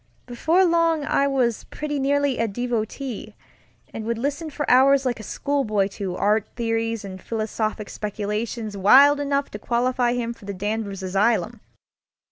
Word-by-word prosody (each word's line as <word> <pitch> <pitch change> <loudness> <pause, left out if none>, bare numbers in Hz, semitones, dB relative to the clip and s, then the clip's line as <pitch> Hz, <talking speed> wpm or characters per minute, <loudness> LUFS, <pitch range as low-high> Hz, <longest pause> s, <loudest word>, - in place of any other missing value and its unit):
Before 320 +10 +2
long 335 -3 +2
I 280 - +2
was 250 -5 0
pretty 295 -1 -4
nearly 280 -1 +1
a 230 - +1
devotee, 230 0 -4 0.6
and 225 - -5
would 230 +1 -2
listen 285 +6 -3
for 295 0 -4
hours 270 +2 +5
like 245 -2 -1
a - - -7
schoolboy 215 -4 -1
to 195 -3 -5
art 210 +2 +1
theories 225 -2 -1
and 185 -1 -8
philosophic 215 -1 -3
speculations 210 +1 -4
wild 275 +9 +6
enough 280 -1 -1
to 210 - -7
qualify 245 +1 +1
him 235 -1 -2
for 220 - -16
the 200 -1 -5
Danvers 205 0 -3
asylum. 210 +3 +1
235 Hz, 150 wpm, -23 LUFS, 210-275 Hz, 0.6 s, wild